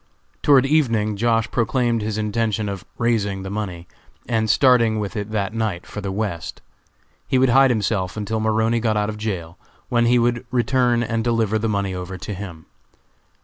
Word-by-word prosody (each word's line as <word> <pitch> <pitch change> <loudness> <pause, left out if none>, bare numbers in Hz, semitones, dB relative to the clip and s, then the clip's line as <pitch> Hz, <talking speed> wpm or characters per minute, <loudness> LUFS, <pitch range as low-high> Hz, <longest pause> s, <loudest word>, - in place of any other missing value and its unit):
Toward 135 -3 +5
evening 115 -8 +2
Josh. 115 +1 +1
proclaimed 120 0 +1
his 105 0 -3
intention 110 0 -1
of 100 -2 -5
"raising" 105 -5 0
the 95 - -6
money, 95 -5 -5 0.4
and 110 -2 0
starting 115 -2 +4
with 105 +1 -4
it 105 0 -3
that 105 -1 -2
night 110 -6 -2
for 105 - -7
the 100 -1 -3
West. 100 -4 -4 0.6
He 130 - +2
would 130 0 +4
hide 135 +2 +6
himself 105 -4 -1
until 105 +1 -2
Maroney 110 +1 +1
got 110 -2 0
out 105 0 0
of 105 - -5
jail, 90 -6 -4 0.3
when 120 -1 +2
he 125 +1 +4
would 120 0 +1
return 125 -1 +2
and 115 -1 -1
deliver 115 -2 +1
the 110 +1 -1
money 100 -2 -1
over 90 +1 -6
to 100 +3 -6
him. 90 -5 -8
110 Hz, 180 wpm, -21 LUFS, 100-120 Hz, 0.6 s, hide